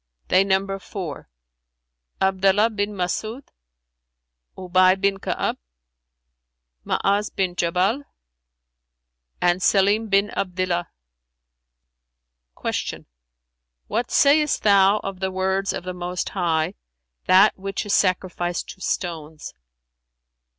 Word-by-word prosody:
"They 185 +1 +5
number 195 0 0
four, 180 - -7 0.9
Abdallah 195 +3 +3
bin 205 -1 -2
Mas'ϊd, 215 +8 -3 1.1
Ubay 185 +1 +3
bin 195 0 +1
Ka'ab, - - -2 1.2
Ma'az 200 +1 0
bin 185 -2 -2
Jabal 185 +11 0 1.3
and 175 +1 +2
Sαlim 205 +4 +3
bin 200 +1 +2
Abdillah." 180 -2 -2 1.7
Q - - -3 0.8
"What 235 +3 -2
sayest 300 +1 +3
thou 200 0 +5
of 195 -1 -5
the 190 0 -1
words 190 +1 -1
of - - -5
the 185 0 -5
Most 180 0 -4
High, 170 -2 0 0.5
'That 190 +2 +5
which 195 +2 -4
is 205 - -1
sacrificed 180 -2 0
to 190 - -10
stones'"? 160 -5 -4
190 Hz, 95 wpm, -23 LUFS, 180-200 Hz, 1.7 s, They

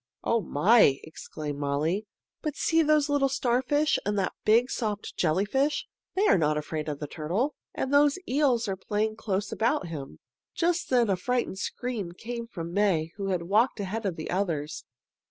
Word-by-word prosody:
"Oh, 230 -1 +2
my!" 170 - +4
exclaimed 150 -2 -7
Molly. 155 +9 -1 0.3
"But 305 -3 -3
see 325 0 +2
those 305 -1 +3
little 285 -2 +2
starfish 265 +3 +1
and 205 0 -1
that 190 -2 0
big 235 +4 +4
soft 210 -3 -3
jellyfish. 205 - +1 0.3
They 395 +3 +2
are 190 - +5
not 150 -1 +2
afraid 155 0 -3
of 145 - -3
the 150 - -5
turtle. 175 - -2 0.2
And 265 - -2
those 285 +1 +5
eels 255 -5 +2
are 195 - -1
playing 215 +3 -2
close 205 -2 -2
about 210 -5 0
him." 145 -4 -7 0.4
Just 345 0 0
then 245 -3 +4
a 195 - +2
frightened 240 0 -1
scream 215 -7 -4
came 235 +4 -6
from 170 -6 -6
May, 180 -6 +2
who 200 -1 -3
had 180 -3 0
walked 215 +8 +2
ahead 205 +2 -2
of 180 - -2
the 155 - -5
others. 165 -5 -2
210 Hz, 170 wpm, -27 LUFS, 170-250 Hz, 0.4 s, are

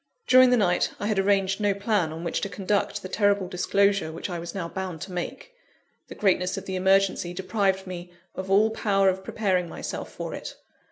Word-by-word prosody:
During 255 0 +7
the 250 - +4
night, 180 -5 +2
I - - -3
had 210 -2 +1
arranged 195 0 +2
no 205 -1 +2
plan 200 -5 0
on 165 +1 -7
which 170 - -2
to 200 - -2
conduct 205 +1 -1
the - - -4
terrible 200 -1 +1
disclosure 195 0 +1
which 165 +4 -6
I 175 - -3
was 170 +2 -7
now 175 -4 -3
bound 185 -1 -5
to 190 - -7
make 180 - -6 0.5
the - - -10
greatness 185 -1 +1
of 195 - -6
the 190 - -4
emergency 190 -1 +2
deprived 190 0 0
me 175 -1 -7 0.2
of 190 0 -6
all 210 +3 +4
power 195 -3 +2
of 190 0 -2
preparing 185 -5 0
myself - - -6
for - - -6
it. - - -7
190 Hz, 205 wpm, -26 LUFS, 180-200 Hz, 0.5 s, During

